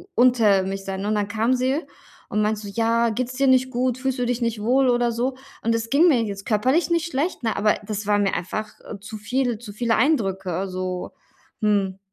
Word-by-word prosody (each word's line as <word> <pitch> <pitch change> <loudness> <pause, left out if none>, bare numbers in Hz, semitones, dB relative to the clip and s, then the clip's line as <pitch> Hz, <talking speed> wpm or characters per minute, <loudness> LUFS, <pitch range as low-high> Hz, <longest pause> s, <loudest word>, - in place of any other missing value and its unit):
unter 230 -6 +4
mich 195 +1 -4
sein, 190 0 -4
ne? 205 - -2
Und 215 - +1
dann 205 -1 0
kam 225 +4 +1
sie 260 +5 0 0.5
und 210 - 0
meinte 215 0 0
so: 205 - -7
„Ja, 230 +2 +1
geht's 245 +3 -3
dir 275 +1 +2
nicht 260 0 +3
gut? 250 0 0
Fühlst 265 0 -2
du 250 - +1
dich 245 0 -1
nicht 230 -2 -1
wohl 260 +4 +3
oder 240 -1 +2
so?” 250 +3 -1 0.3
und 230 0 +2
es 230 0 -3
ging 295 +7 +5
mir 265 -8 +4
jetzt 200 -2 -6
körperlich 255 +11 +2
nicht 335 0 +1
schlecht, 285 0 -2
ne, 225 - -1
aber 210 +1 +3
das 210 0 -4
war 205 0 +3
mir 200 -1 +1
einfach, 210 +5 -5
äh, 200 - -9
zu 215 +1 -8
viel 245 +2 -1
zu 215 -3 -10
viele 230 +1 +1
Eindrücke, 195 - 0
so, 185 -1 -4 0.5
hm. 200 -3 +1
225 Hz, 225 wpm, -23 LUFS, 205-255 Hz, 0.5 s, ging